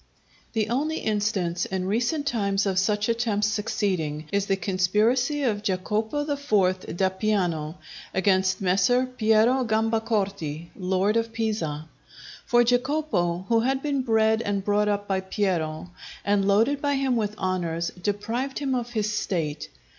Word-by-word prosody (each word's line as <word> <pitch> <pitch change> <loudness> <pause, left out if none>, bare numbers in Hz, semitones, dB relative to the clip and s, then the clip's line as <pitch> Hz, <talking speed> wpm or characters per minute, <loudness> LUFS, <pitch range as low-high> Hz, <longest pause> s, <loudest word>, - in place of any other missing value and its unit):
The 220 -2 0
only 300 +6 0
instance 205 -5 -1
in 190 -1 -3
recent 240 +9 0
times 200 -6 0
of 190 -2 +1
such 210 +2 +1
attempts 225 -3 +1
succeeding, 185 -8 -1
is 200 0 0
the 195 - +2
conspiracy 215 - +1
of 215 -5 0
Jacopo 210 +7 -1
IV. 215 -11 0
d'Appiano 185 -5 0 0.4
against 190 0 +2
Messer 195 +7 +3
Piero 240 +1 +3
Gambacorti, 215 -8 -1
lord 190 +3 +1
of 230 0 -1
Pisa. 190 -10 -2 0.6
For 240 -2 +5
Jacopo, 245 - 0
who 230 -1 +3
had 265 +3 0
been 285 -2 0
bred 220 -2 +2
and 200 -3 -2
brought 210 0 +2
up 205 0 -1
by 195 -1 +1
Piero, 180 -4 -2 0.3
and 200 -1 +2
loaded 230 +8 +3
by 285 -1 +1
him 270 -2 +1
with 210 -2 -1
honours, 170 -3 -1
deprived 225 +7 -2
him 275 -2 -1
of 240 -1 -3
his 215 -1 0
State. 155 -7 -2
210 Hz, 140 wpm, -25 LUFS, 190-235 Hz, 0.6 s, For